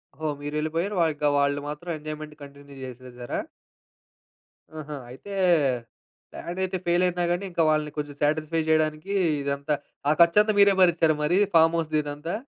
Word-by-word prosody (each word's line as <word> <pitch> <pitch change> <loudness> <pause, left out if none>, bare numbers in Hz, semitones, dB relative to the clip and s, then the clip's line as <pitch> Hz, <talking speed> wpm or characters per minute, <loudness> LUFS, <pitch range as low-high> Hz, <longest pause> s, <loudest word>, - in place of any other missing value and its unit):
ఓహో! 155 +2 -3
మీరెళ్ళిపోయారు 155 +6 -2
వాళ్ళు 165 -2 +2
ఇంక, 150 - -3
వాళ్ళు 140 0 +1
మాత్రం 150 +4 -7
ఎంజాయ్‌మెంట్ 155 0 -7
కంటిన్యూ 140 0 -13
చేసేసారా? 125 -1 -7 1.4
ఆహా! 150 -1 -6
అయితే 135 +11 -10 1.0
ప్లానయితే 185 +2 -3
ఫెయిల్ 175 +1 +2
అయినా 180 -1 0
గాని, 175 +3 -1
ఇంక 170 - 0
వాళ్ళని 155 -1 0
కొంచెం 145 -1 -4
సాటిస్ఫై 155 +2 +1
చేయడానికి 155 +4 +1 0.3
ఇదంతా 140 +2 -1 0.3
ఆ - - +5
ఖర్చంతా 210 +6 +5
మీరే 200 0 +7
భరించారా 165 -3 +4
మరి? 175 +5 +2 0.2
ఫార్మ్‌హౌస్‌ది 165 -1 +3
ఇదంతా. 145 +3 -5
155 Hz, 135 wpm, -25 LUFS, 145-170 Hz, 1.4 s, మీరే